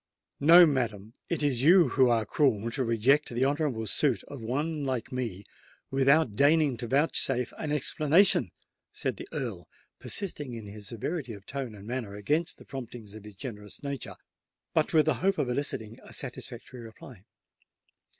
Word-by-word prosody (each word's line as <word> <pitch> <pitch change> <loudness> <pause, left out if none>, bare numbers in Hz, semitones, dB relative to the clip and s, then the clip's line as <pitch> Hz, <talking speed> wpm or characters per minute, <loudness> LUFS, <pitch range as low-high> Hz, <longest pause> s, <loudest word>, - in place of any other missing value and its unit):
"No, 170 +4 +9
madam—it 120 - -2
is 135 -5 +1
you 170 +1 +6
who 130 0 +4
are 115 -2 +2
cruel 115 -3 +1
to 130 - -1
reject 125 +6 +2
the 120 +2 0
honourable 140 -5 0
suit 130 +2 +1
of 140 -4 -9
one 145 +6 -2
like 130 -4 -3
me 115 -7 -4 0.5
without 135 -2 +3
deigning 145 0 +4
to 120 0 -4
vouchsafe 135 -2 +1
an 150 - -3
explanation," 155 +5 +3 0.4
said - - -3
the - - -8
Earl, - - -5 0.3
persisting 145 - -4
in 115 -2 -8
his 105 0 -9
severity 125 - -4
of 100 -1 -12
tone 135 -6 -5
and 100 0 -12
manner 115 -4 -4
against 150 +12 -1
the - - -15
promptings 120 -5 -8
of 110 -1 -11
his 105 -1 -11
generous 105 -2 -8
nature, 140 -3 -5 0.6
but - - +2
with 155 -2 +4
the 155 - +3
hope 195 +1 +2
of 125 - 0
eliciting 115 -4 -3
a - - -14
satisfactory 125 -1 -6
reply. 115 -2 -12
130 Hz, 160 wpm, -28 LUFS, 115-145 Hz, 0.6 s, No